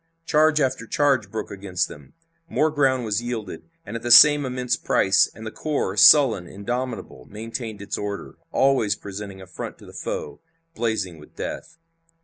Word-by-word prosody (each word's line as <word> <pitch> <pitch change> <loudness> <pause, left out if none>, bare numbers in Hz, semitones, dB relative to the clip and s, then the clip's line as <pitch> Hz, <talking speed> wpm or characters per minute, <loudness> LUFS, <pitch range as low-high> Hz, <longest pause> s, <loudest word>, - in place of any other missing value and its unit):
Charge 155 -1 +3
after 130 -5 -1
charge 135 -8 +1
broke 110 0 -5
against 95 -3 -2
them. 75 -2 -14 0.4
More 155 -1 +1
ground 135 -4 +1
was 105 +1 -1
yielded, 120 - -6 0.2
but - - -8
at 115 - -4
the 120 - -4
same 145 +3 +8
immense 125 -1 -1
price, - - +2
and 110 +2 -10
the 110 - -5
corps, 145 -11 -2
sullen, 110 - +6
indomitable, 120 +2 -5
maintained 110 0 -7
its 100 - -4
order, 100 -1 -6 0.2
always 130 -7 +2
presenting 100 -1 -8
a - - -11
front 95 - -8
to - - -16
the - - -14
foe, 75 0 -5 0.3
blazing 105 - -2
with 75 - -17
death. - - -7
115 Hz, 165 wpm, -23 LUFS, 100-130 Hz, 0.4 s, same